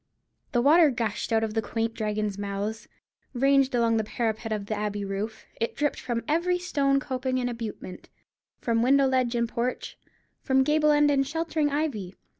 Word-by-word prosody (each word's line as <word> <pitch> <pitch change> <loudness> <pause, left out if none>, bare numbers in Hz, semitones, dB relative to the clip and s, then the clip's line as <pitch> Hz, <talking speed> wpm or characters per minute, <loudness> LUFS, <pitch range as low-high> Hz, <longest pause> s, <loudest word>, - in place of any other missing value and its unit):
The 240 -4 +1
water 315 +3 +6
gushed 230 -3 -3
out 225 0 +3
of 220 -1 -2
the 225 - +1
quaint 225 +2 -2
dragons' 210 -2 -2
mouths, 205 +2 -4 0.5
ranged 275 0 +3
along 230 -1 +2
the 220 - +1
parapet 220 0 -3
of 210 -2 -2
the 215 - -3
Abbey 205 -1 -3
roof; 205 +3 -4
it 230 - -2
dripped 295 0 -1
from 235 -2 -3
every 345 +4 +1
stone 280 -6 +1
coping 260 -1 -2
and 250 -1 0
abutment; 225 -6 -7 0.5
from 230 -1 0
window 275 +3 +4
ledge 255 -2 +1
and 235 0 +1
porch, 240 +2 -3 0.4
from 265 -1 +3
gable 300 +2 +3
end 295 0 +4
and 275 -1 +2
sheltering 320 -1 -1
ivy. 280 - -2
240 Hz, 175 wpm, -26 LUFS, 220-275 Hz, 0.5 s, water